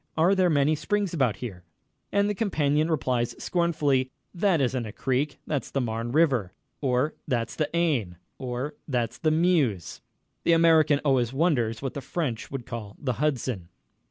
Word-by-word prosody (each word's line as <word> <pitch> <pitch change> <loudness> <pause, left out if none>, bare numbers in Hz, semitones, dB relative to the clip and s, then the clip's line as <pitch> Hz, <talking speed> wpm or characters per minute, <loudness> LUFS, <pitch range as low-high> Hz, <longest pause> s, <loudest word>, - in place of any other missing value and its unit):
Are 170 +5 +4
there 185 -2 +3
many 145 -1 +3
springs 200 +4 -1
about 130 -9 +1
here?" 95 -8 -7 0.5
And 200 0 +2
the 210 - 0
companion 155 -7 +1
replies 125 -6 0
scornfully: 150 -7 +1 0.2
"That 185 -2 +2
isn't 125 -3 0
a - - -6
creek 135 +6 -1
that's 145 -3 -2
the 135 - -1
Marne 115 -1 -2
River," 130 - +2 0.3
or 130 +2 +1
"That's 120 -5 -1
the 155 - -1
Aisne," 145 - 0 0.2
or 130 +2 -3
"That's 120 -5 -1
the 155 - +2
Meuse." 155 - +1 0.4
The 170 - +4
American 160 -3 +5
always 130 -3 +2
wonders 135 -7 +1
what 135 - -3
the 140 - -5
French 135 -8 -3
would 135 -4 -5
call 110 -4 -7
the 125 -5 -2
Hudson. 125 - -1
140 Hz, 160 wpm, -26 LUFS, 120-160 Hz, 0.5 s, American